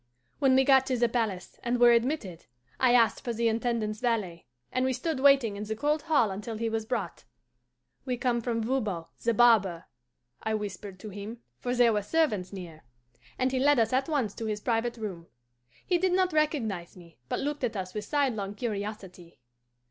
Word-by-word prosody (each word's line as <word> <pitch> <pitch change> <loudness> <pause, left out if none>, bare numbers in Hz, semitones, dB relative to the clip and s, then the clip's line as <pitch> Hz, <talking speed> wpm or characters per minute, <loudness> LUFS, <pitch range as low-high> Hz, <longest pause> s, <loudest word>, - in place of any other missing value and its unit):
"When 265 -2 +4
we 265 - +5
got 265 -1 +5
to 255 - 0
the 240 0 +3
palace, 220 -6 -3
and 240 0 -1
were 240 0 +7
admitted, 235 - 0 0.3
I 250 -1 +4
asked 230 -2 +3
for 240 -3 -2
the 230 +1 +1
Intendant's 225 -2 -1
valet, 215 -9 -2 0.2
and 255 - 0
we 260 0 +1
stood 275 +3 -2
waiting 270 -6 +4
in 205 - -5
the 220 +1 -3
cold 295 +5 0
hall 290 -10 +2
until 210 +3 -5
he 225 +1 -1
was 220 -1 -3
brought. 250 - -3 0.8
'We 250 -2 -2
come 240 -1 0
from 230 -1 -1
Voban, 215 -9 -1 0.2
the 235 -1 +2
barber,' 205 -8 +4 0.6
I 220 0 -1
whispered 200 -2 -6
to 215 - -7
him, 210 +4 -8 0.2
for 245 0 -2
there 240 -2 +5
were 210 - +1
servants 210 - 0
near; 175 -5 -9 0.6
and 255 0 +1
he 260 - 0
led 290 +1 +4
us 225 0 +2
at 265 +4 +1
once 260 -10 0
to 225 - -6
his 210 -1 -2
private 235 +1 -1
room. 190 -7 -6 0.6
He 355 -2 +2
did 370 0 +1
not 370 -2 +2
recognize 230 - -1
me, 170 -2 -16
but - - -1
looked 290 0 -3
at 225 -3 -1
us 185 -1 -5
with 210 - -4
sidelong 230 -9 -1
curiosity. 200 - -6
230 Hz, 195 wpm, -28 LUFS, 205-260 Hz, 0.8 s, were